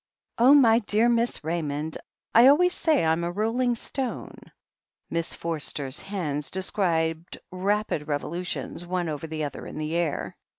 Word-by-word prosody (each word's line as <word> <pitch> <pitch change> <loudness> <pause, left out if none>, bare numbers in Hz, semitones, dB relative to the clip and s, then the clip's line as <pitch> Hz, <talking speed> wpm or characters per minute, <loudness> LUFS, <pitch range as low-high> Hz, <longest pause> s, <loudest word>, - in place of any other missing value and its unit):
"Oh, 260 +5 +7
my 230 -5 +6
dear 215 +1 +2
Miss 235 -4 0
Raymond! 155 -1 -3 0.3
I 235 +3 +8
always 355 +6 +5
say 310 - +2
I'm 160 +1 +1
a 170 - -1
rolling 230 +5 0
stone!" 255 +2 -4 0.8
Miss 165 0 -2
Forster's 150 -4 -3
hands 155 -8 -3
described 170 -3 -1
rapid 190 -4 -1
revolutions 170 +4 -3
one 175 -1 -2
over 155 +1 -5
the 155 -1 -4
other 145 - -5
in - - -8
the 155 +1 -3
air. 170 -4 -2
175 Hz, 140 wpm, -26 LUFS, 160-225 Hz, 0.8 s, I